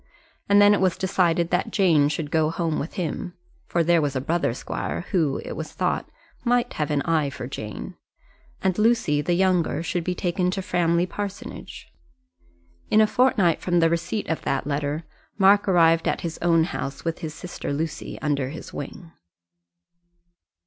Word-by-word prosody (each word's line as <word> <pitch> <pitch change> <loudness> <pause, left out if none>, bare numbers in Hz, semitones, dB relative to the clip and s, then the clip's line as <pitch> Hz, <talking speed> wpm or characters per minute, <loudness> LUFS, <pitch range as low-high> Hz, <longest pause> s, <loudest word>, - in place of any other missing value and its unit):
And 200 0 +6
then 205 0 +7
it 205 - +1
was 185 -3 +2
decided 175 -3 +1
that 180 +1 +1
Jane 160 -8 +3
should 150 -1 -3
go 160 -1 +2
home 165 -1 -1
with 155 - -5
him, 180 +1 -4 0.3
for 170 - +1
there 170 0 +3
was 145 -2 -1
a - - +1
brother 160 0 0
squire - - -4
who, 155 -7 +1
it - - -6
was - - -6
thought, - - -1 0.3
might 245 0 +1
have 150 -2 -2
an 145 -2 0
eye 160 -4 +1
to 140 - -7
Jane; 110 -5 -6 0.7
and 190 +1 +1
Lucy, 215 -10 +3
the 175 +3 0
younger, 180 -3 +1
should 170 0 -2
be 180 +1 -2
taken 180 0 0
to 190 +1 -2
Framley 175 -2 +1
Parsonage. 200 +2 -7 1.0
In 215 - +4
a 215 - +7
fortnight 215 -8 +2
from 175 -1 +1
the 165 -1 +3
receipt 170 +5 -2
of 160 - -2
that 135 - -1
letter 145 +2 -2 0.3
Mark 200 +1 +5
arrived 165 -3 +4
at - - 0
his 165 -2 -5
own 165 -1 +4
house 140 -3 -5
with 165 0 -2
his 160 -3 -6
sister 175 -4 -6
Lucy 155 +2 -4
under 140 -3 0
his 155 - -9
wing. 165 +4 -8
170 Hz, 175 wpm, -24 LUFS, 155-185 Hz, 1.0 s, then